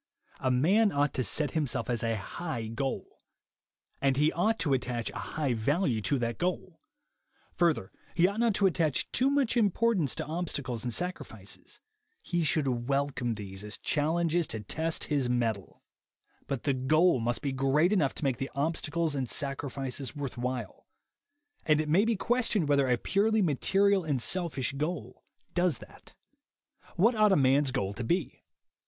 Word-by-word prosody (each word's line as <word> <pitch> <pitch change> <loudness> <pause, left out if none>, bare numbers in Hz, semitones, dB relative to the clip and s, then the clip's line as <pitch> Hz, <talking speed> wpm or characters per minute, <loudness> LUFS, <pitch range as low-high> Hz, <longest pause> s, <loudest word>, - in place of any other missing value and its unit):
A 130 - 0
man 190 - +3
ought 145 0 +1
to 130 - 0
set 145 +8 +1
himself 150 -6 -1
a 115 -2 0
high 120 +3 -5
goal, 130 +5 -4 0.8
and 135 -1 +2
he 150 +2 +3
ought 215 +6 +1
to 150 -10 0
attach 125 -3 -2
a - - -6 0.2
high 145 -5 +1
value 125 - 0
to 140 +6 +1
that 120 -2 -2
goal. 180 -1 -3 0.7
Further, 165 - +1 0.2
he 175 +1 +5
ought 200 +3 -3
not 230 -3 +2
to 200 - +2
attach 165 -6 +1
too 260 +2 +2
much 280 -4 +1
importance 210 - +2
to - - -3
obstacles 145 -8 -3
and 125 - -2
sacrifices; 180 +9 -4 0.4
he 175 - -1
should 135 -6 0
welcome 135 -4 0
these 95 -2 -8
as 105 -1 -5
challenges 165 +2 +1
to 110 - -3
test 160 +10 -1
his 140 -5 0
mettle. 115 -5 -2 0.6
But 135 -3 -3
the 140 - +1
goal 155 +4 +3
must 120 +1 -1
be 140 - 0
great 135 +7 +2
enough 150 -10 +1
to - - -7
make 135 -4 +1
the 135 +1 -4
obstacles 160 +2 0
and 130 -4 -2
sac 140 -1 -1
rifices 135 0 -4
worth 140 -3 -4
while; 120 -3 -5 0.8
and 155 -1 +3
it 155 - -1
may 180 +8 +4
be 230 0 +1
questioned 230 -6 +1
whether 140 -2 +3
a 125 - +3
purely 210 - +2
material 195 +5 +2
and 145 -5 -1
selfish 150 -2 0
goal 145 -4 -4 0.3
does 175 -2 +1
that. - - -15 0.8
What 220 +8 +4
ought 215 -2 +4
a - - +5
man's 135 +1 +3
goal 100 -7 -2
to 120 - -5
be? 170 +4 -1
145 Hz, 165 wpm, -29 LUFS, 125-175 Hz, 0.8 s, he